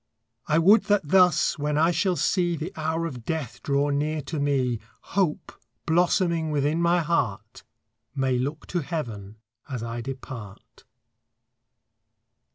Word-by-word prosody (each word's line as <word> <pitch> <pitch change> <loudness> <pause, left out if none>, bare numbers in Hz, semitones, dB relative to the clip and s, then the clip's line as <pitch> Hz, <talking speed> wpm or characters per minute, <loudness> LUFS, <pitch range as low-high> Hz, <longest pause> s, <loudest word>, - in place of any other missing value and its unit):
I 155 - +3
would 200 +6 +5
that 200 -7 +1
thus, 180 -4 +4
when 150 0 0
I 165 +3 +4
shall 180 +2 +1
see 175 -1 +1
The 160 +2 -5
hour 160 +1 -1
of 130 -8 -6
death 130 -5 -4
draw 140 +1 +1
near 150 +2 0
to 155 +2 -4
me, 130 -5 +1 0.3
Hope, 185 -6 0 0.3
blossoming 170 -1 +2
within 150 +2 0
my 170 +1 +3
heart, 115 -10 -2 0.5
May 130 -2 +1
look 145 +5 -3
to 175 - 0
heaven 115 - -5 0.3
as 125 -4 -4
I 115 0 -4
depart. 125 -5 -9
150 Hz, 135 wpm, -25 LUFS, 130-170 Hz, 0.5 s, would